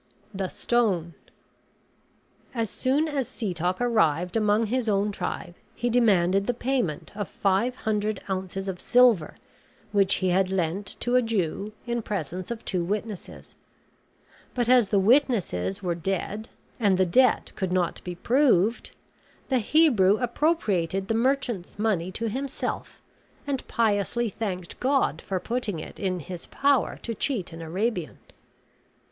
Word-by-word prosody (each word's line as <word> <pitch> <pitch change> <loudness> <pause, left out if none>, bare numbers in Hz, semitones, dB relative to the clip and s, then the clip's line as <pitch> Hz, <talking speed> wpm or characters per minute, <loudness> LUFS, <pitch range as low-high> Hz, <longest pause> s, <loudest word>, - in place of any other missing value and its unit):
THE 190 -1 -2
STONE 190 -8 0 1.4
As 225 -3 -1
soon 280 +5 +1
as 280 -5 -2
Setoc 180 -3 -2
arrived 180 -8 +2
among 215 0 +3
his 240 +1 -1
own 205 0 +1
tribe 175 - -4 0.2
he 240 0 -1
demanded 195 -5 +3
the 245 - 0
payment 240 - -1
of 205 -1 -4
five 200 +6 +1
hundred 215 -3 -1
ounces 190 0 -3
of 185 -2 -4
silver, 245 -10 +4 0.6
which 200 -1 +3
he 185 - 0
had 185 +1 +2
lent 185 +2 -1
to 245 +1 +1
a 250 - +6
Jew 210 -3 -1
in 240 -1 -1
presence 185 -4 -4
of 235 -1 -6
two 180 -3 0
witnesses; 205 +2 -5 1.0
but 240 -2 +1
as 245 -5 +5
the 205 - +2
witnesses 195 - +2
were 175 -2 0
dead, 195 +5 -3 0.3
and 200 -5 +3
the 185 - +4
debt 250 +8 +3
could 190 -3 -2
not 180 -2 0
be 180 -1 -5
proved, 230 -1 +2 0.6
the 260 -2 +3
Hebrew 220 - +4
appropriated 210 - 0
the - - +2
merchant's 235 -6 0
money 200 -5 0
to 230 - -2
himself, 270 +5 -4 0.4
and 280 -3 -3
piously 225 +1 +1
thanked 185 -4 -5
God 260 - +1
for 190 -2 -2
putting 230 -4 -2
it 155 - -9
in 185 -3 -1
his 175 +3 -8
power 280 -1 +1
to 230 - -3
cheat 215 - -2
an 165 - -8
Arabian. 180 +1 -2
205 Hz, 140 wpm, -26 LUFS, 185-240 Hz, 1.4 s, a